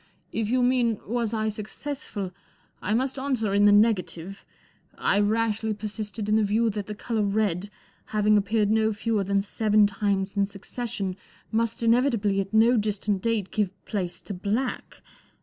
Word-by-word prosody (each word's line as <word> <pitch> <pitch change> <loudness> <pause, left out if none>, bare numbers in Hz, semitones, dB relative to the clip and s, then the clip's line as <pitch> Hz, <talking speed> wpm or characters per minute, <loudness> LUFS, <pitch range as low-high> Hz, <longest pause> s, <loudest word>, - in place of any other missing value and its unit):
44 - - -2
If 215 - -2
you 250 +1 +2
mean, 245 -3 +2
was 235 0 -1
I 220 -1 0
successful, 215 -1 -5 0.5
I 205 +3 0
must 260 +2 -1
answer 250 -7 -1
in 205 +1 +4
the 205 - +7
negative. 195 -3 +1 0.5
I 200 - +2
rashly 220 +1 +1
persisted 210 0 -5
in 215 +1 +3
the 220 - +3
view 220 +3 +2
that 205 -1 -5
the 210 - -5
colour 225 +1 -2
red, 200 -2 0 0.4
having 210 0 +2
appeared 210 0 +2
no 220 0 +2
fewer 215 0 0
than 200 +1 +1
seven 210 0 +3
times 200 -1 -1
in 200 -1 +2
succession, 200 -1 -5 0.3
must 230 +1 0
inevitably 230 -4 +3
at 195 - -6
no 230 +3 +5
distant 210 -2 0
date 220 -4 -1
give 200 -3 -1
place 185 -5 -3
to 205 - -6
black. 215 +7 -3
210 Hz, 165 wpm, -26 LUFS, 200-230 Hz, 0.5 s, the